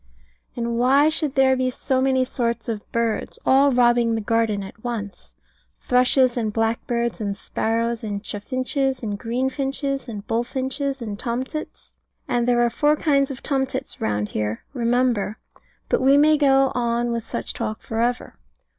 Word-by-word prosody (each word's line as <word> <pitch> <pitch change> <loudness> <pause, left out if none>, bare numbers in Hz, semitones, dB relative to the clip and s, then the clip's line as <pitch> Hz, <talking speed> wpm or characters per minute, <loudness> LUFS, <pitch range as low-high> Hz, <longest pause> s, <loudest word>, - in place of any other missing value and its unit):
And 235 -1 -2
why 275 +5 +5
should 310 -3 -2
there 265 -1 +4
be 255 0 0
so 260 +1 -1
many 260 -1 +2
sorts 235 -2 -2
of 220 -3 -5
birds, 230 -1 -1
all 275 +2 +5
robbing 240 -2 +3
the - - -1
garden 220 -2 0
at 195 +3 -12
once? 225 -5 -5 0.6
Thrushes, 255 0 +3
and 220 -3 0
blackbirds, 230 +1 -1
and 200 -1 -2
sparrows, 230 +3 -1
and 205 -1 -4
chaffinches, 255 +5 -2
and 205 -2 -3
greenfinches, 270 +2 -2
and 205 -2 -7
bullfinches, 265 +3 -2
and 210 -2 -5
tomtits. 260 +5 -5 0.3
And 240 0 0
there 240 -1 +3
are 235 - 0
four 295 +5 +3
kinds 280 -3 +2
of 265 -3 -7
tomtits 265 -2 -2
round 105 -1 -1
here, 105 +1 -3
remember: 240 -4 +1 0.5
but - - +1
we 270 +2 +5
may 305 +1 +5
go 270 -2 +4
on 240 0 0
with 230 -1 -2
such - - -4
talk 220 -2 -4
for 225 - -4
ever. 245 +1 -1
240 Hz, 155 wpm, -23 LUFS, 225-265 Hz, 0.6 s, why